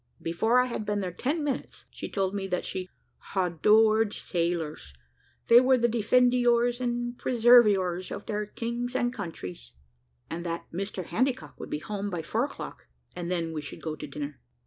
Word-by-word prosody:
Before 220 +9 +2
I 250 - +4
had 235 -3 -3
been 210 -1 -1
there 185 -2 -2
ten 290 - -1
minutes, 280 -3 -4
she - - -7
told 195 -1 -1
me 195 -1 -2
that 180 -1 -2
she 185 -1 -4 0.5
"hadored 210 +4 +4
sailors 165 - -2 0.5
they 235 +1 +8
were 260 0 +4
the 240 0 +3
defendiours 245 +1 +3
and 240 0 -2
preserviours 210 -7 +4
of 205 - -6
their 210 -1 -2
kings 240 +3 -4
and 245 -1 +1
countries," 90 - -7 0.5
and 170 +1 -5
that 170 -1 -4
Mr 190 0 -4
Handycock 255 +9 -1
would - - -7
be - - -1
home 205 +5 -4
by 175 -4 -3
four - - 0
o'clock, - - -8 0.3
and 175 -1 -4
then 170 -2 -1
we 155 - -3
should 145 - -9
go 155 -2 -3
to - - -7
dinner. 145 -1 -6
205 Hz, 170 wpm, -28 LUFS, 175-240 Hz, 0.5 s, they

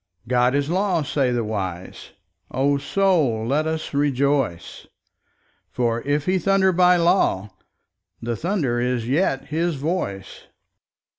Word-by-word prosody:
God 125 +1 +2
is 140 0 0
law, 180 -1 0
say 135 -2 0
the 120 -1 0
wise; 95 -4 -5 0.4
O 140 +2 +1
Soul, 155 - +1
and 115 - -4
let 150 +3 +1
us 160 -1 -4
rejoice, 140 -8 -1 0.8
For 120 -1 -1
if 145 +2 -1
He 185 0 +1
thunder 195 +1 +3
by 180 0 +4
law 170 - +1 0.7
the 120 0 -3
thunder 155 - -1
is 120 -1 -1
yet 135 0 0
His 165 +1 -1
voice. 135 - -4
140 Hz, 130 wpm, -22 LUFS, 120-170 Hz, 0.8 s, by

